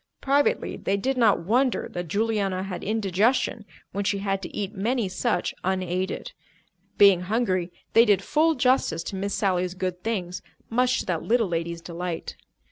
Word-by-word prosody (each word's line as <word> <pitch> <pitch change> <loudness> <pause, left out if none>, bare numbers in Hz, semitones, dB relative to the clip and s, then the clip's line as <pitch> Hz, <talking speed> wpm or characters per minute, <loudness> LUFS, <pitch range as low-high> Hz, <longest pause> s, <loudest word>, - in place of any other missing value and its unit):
Privately, 285 - +1
they 195 - -1
did 265 +7 -1
not 225 -8 +3
wonder 250 +5 +1
that 175 -1 -4
Juliana 200 -1 0
had 190 -2 -6
indigestion 215 +2 +1 0.3
when 200 +2 -2
she 200 +1 0
had 195 -1 -1
to - - -6
eat 205 0 -4
many 225 +2 0
such 185 -1 -1
unaided. 185 0 -2 0.7
Being 195 -3 +7
hungry, 185 -3 0 0.2
they 230 +1 +7
did 205 -4 +3
full 315 +1 +2
justice 255 - +2
to - - -5
Miss 200 +1 -2
Sally's 185 -2 0
good 185 -1 -3
things, 185 -6 -3 0.3
much 250 +2 +2
to - - -8
that 170 -3 -1
little 230 -3 +1
lady's 170 0 -3
delight. 170 0 -5
195 Hz, 160 wpm, -25 LUFS, 180-230 Hz, 0.7 s, Being